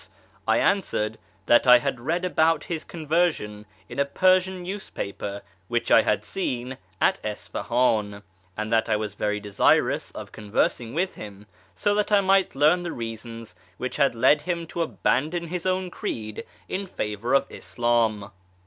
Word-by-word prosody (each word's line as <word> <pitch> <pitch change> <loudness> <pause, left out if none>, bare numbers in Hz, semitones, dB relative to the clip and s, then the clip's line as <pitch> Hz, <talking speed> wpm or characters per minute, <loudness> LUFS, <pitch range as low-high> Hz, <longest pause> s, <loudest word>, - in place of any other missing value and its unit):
I - - +4
answered 110 - 0 0.3
that 120 - +5
I 125 0 +10
had 130 0 -2
read 170 +9 -1
about 165 -2 +2
his 165 -4 -4
conversion 155 -11 -1 0.2
in 120 +3 -7
a - - +5
Persian 185 +5 +2
newspaper 100 - -5 0.2
which 120 -1 -1
I - - +8
had - - 0
seen 130 -7 -3 0.2
at - - +2
Isfahan, 105 -1 -1 0.3
and 110 +1 -2
that 115 0 +2
I 110 - +3
was 105 -1 -3
very 105 0 -1
desirous 105 -1 +2
of - - -8
conversing 115 +3 -1
with 185 +3 0
him, 105 -1 -10 0.3
so 205 - +1
that 210 +1 0
I 205 - +6
might 195 -3 +2
learn 155 +6 +4
the 175 -1 -4
reasons 115 -1 -7 0.2
which 130 - -4
had 140 -4 +3
led 130 +6 +4
him 170 +1 -3
to 170 - -1
abandon 150 - 0
his 180 +1 -3
own 185 -1 -1
creed 110 - -5 0.2
in 195 +1 -3
favour 110 - -2
of 140 - +3
Islam. 115 -4 0
125 Hz, 155 wpm, -25 LUFS, 110-175 Hz, 0.3 s, I